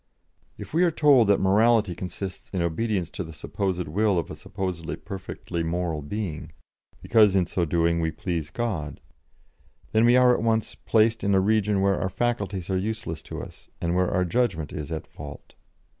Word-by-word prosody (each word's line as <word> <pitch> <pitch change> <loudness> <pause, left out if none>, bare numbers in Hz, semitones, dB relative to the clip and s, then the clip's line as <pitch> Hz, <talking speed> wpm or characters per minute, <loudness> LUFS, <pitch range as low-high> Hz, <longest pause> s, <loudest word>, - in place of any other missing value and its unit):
If - - -9
we 170 +3 +4
are 175 - +5
told 145 -8 +5
that 100 - +4
morality 105 +1 +3
consists 90 +2 -6
in 90 -3 -1
obedience 90 +2 -1
to - - -4
the 80 - -9
supposed 90 +3 -3
will 100 +4 +1
of 85 - -2
a - - -6
supposed 90 -3 -5 0.2
perfectly 90 -3 -5
moral 85 -1 -2
being, 80 -1 -5 0.5
because 105 -4 +5
in 95 -2 +3
so 85 0 -1
doing 85 +1 +1
we 80 - +1
please 80 -2 -3
God, 80 -8 -3 0.9
then 110 +1 +3
we 120 +1 +6
are 125 -1 +6
at - - 0
once 110 -1 0
placed 110 0 +2
in 100 -1 +3
a - - +5
region 105 0 +2
where 100 -1 +2
our 95 - 0
faculties 100 -5 -2
are 95 - +1
useless 110 -3 -3
to - - -7
us, - - -13
and 85 0 -1
where 90 0 +2
our 90 -1 +1
judgment 90 -6 0
is 75 -2 -5
at 80 -1 -4
fault. 70 -1 -11
95 Hz, 185 wpm, -25 LUFS, 85-110 Hz, 0.9 s, we